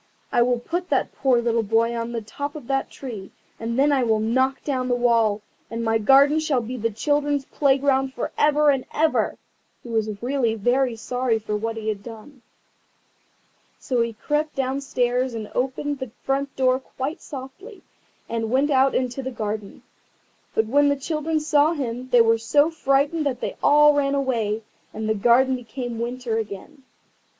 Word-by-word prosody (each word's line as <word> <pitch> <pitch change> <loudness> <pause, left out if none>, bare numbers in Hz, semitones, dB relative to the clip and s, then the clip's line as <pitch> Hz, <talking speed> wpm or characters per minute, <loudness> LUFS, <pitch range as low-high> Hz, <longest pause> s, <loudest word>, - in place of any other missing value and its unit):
I 240 - +3
will 245 0 +3
put 350 +8 -4
that - - 0
poor 260 -3 +2
little 230 -1 +1
boy 225 +2 +1
on 230 0 -3
the 230 -2 -4
top 285 +7 -6
of 295 - -8
the 270 +1 -1
tree, 220 -8 -8 0.3
and 230 +1 -3
then 285 +2 +4
I 275 -2 +3
will 220 -2 +2
knock 260 +5 0
down 260 -3 -1
the 245 - +1
wall, 230 -4 +2 0.3
and 230 +1 -4
my 225 0 +1
garden 275 +7 +5
shall 305 -5 +1
be 240 +3 -6
the 230 -2 -1
children's 290 +4 0
playground 270 -1 +1
for 240 - -3
ever 295 0 +4
and 270 -2 -1
ever." 315 0 +1 0.5
He 240 - -10
was 215 -2 -1
really 245 -3 0
very 245 +3 +1
sorry 245 +1 -1
for 210 -1 -4
what 225 +2 -3
he 220 -1 -5
had 210 -2 -2
done. 230 +4 -12 1.4
So 250 -3 -1
he 230 0 -1
crept 295 +7 -2
downstairs 255 -2 -1
and 215 -2 -6
opened 270 +3 -2
the 260 -2 -5
front 275 +1 -1
door 255 -1 +2
quite 270 +4 -6
softly, 305 - -10 0.4
and 225 -1 -2
went 275 +5 +2
out 270 0 +3
into 255 +1 -1
the 260 - -4
garden. 215 -4 -5 0.7
But 220 - +2
when 285 +5 +3
the 285 - +2
children 310 +3 -2
saw 300 +1 +3
him 255 -4 -4
they 245 -2 +6
were 225 0 +3
so 290 +8 +3
frightened 290 +1 +1
that 255 -3 -2
they - - -4
all 295 0 +6
ran 280 -1 +1
away, 225 -6 -1 0.3
and 220 0 -3
the 220 - +2
garden 245 +5 +3
became 245 -1 -6
winter 240 -1 -2
again. 225 +7 -8
255 Hz, 175 wpm, -23 LUFS, 230-280 Hz, 1.4 s, they